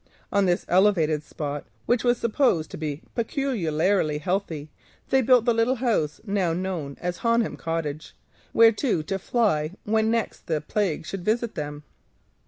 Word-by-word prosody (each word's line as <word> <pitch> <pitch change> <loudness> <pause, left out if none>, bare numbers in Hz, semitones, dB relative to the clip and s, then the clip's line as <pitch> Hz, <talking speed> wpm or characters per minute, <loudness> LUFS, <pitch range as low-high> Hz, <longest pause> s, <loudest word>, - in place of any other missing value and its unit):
On 200 -2 +3
this 175 0 +1
elevated 175 -5 +3
spot, 145 -1 -5 0.2
which 240 -2 +2
was 245 -1 +3
supposed 225 - +1
to - - -6
be 150 -1 -4
peculiarly 195 - 0
healthy, 160 -3 -3 0.4
they 265 - +5
built 250 -2 +4
the 240 - +4
little 230 +3 +2
house 225 - 0
now 195 -5 0
called 175 -6 -4 0.2
Honham 230 -1 +1
Cottage, 160 -2 -4 0.4
whereto 225 - +4
to 195 +5 -3
fly 180 -8 +1
when 220 +1 +1
next 230 -1 -2
the 160 -3 0
plague 165 0 -1
should 195 +1 -5
visit 225 +3 0
them. 150 0 -5
190 Hz, 145 wpm, -25 LUFS, 155-230 Hz, 0.4 s, they